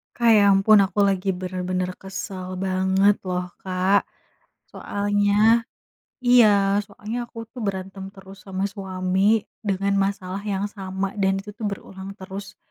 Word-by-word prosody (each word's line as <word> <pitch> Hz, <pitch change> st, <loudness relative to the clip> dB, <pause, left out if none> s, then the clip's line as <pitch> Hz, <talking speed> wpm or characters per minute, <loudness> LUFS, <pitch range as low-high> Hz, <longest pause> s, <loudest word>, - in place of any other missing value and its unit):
Kak, 235 Hz, -1 st, +3 dB
ya 205 Hz, -, +5 dB
ampun 195 Hz, +2 st, +6 dB
aku 200 Hz, -, -4 dB
lagi 195 Hz, 0 st, 0 dB
bener-bener 185 Hz, 0 st, -3 dB
kesel 190 Hz, -1 st, -6 dB
banget 190 Hz, +2 st, +3 dB
loh, 180 Hz, -1 st, -2 dB, 0.2 s
Kak. 185 Hz, +2 st, +2 dB, 0.6 s
Soalnya 205 Hz, +3 st, +2 dB, 0.6 s
iya, 205 Hz, -5 st, +5 dB
soalnya 220 Hz, +3 st, -6 dB
aku 230 Hz, 0 st, -8 dB
tuh 250 Hz, -, -7 dB
berantem 195 Hz, -1 st, -4 dB
terus 195 Hz, 0 st, -14 dB
sama 190 Hz, 0 st, -3 dB
suami 190 Hz, +2 st, 0 dB, 0.2 s
dengan 200 Hz, -1 st, 0 dB, 0.2 s
masalah 190 Hz, -1 st, -6 dB
yang 200 Hz, -1 st, -2 dB
sama 195 Hz, -1 st, -4 dB
dan 195 Hz, 0 st, +2 dB
itu 205 Hz, +2 st, -7 dB
tuh 230 Hz, -, -18 dB
berulang 195 Hz, 0 st, -8 dB
terus. 195 Hz, +1 st, -8 dB
195 Hz, 130 wpm, -23 LUFS, 190-205 Hz, 0.6 s, ampun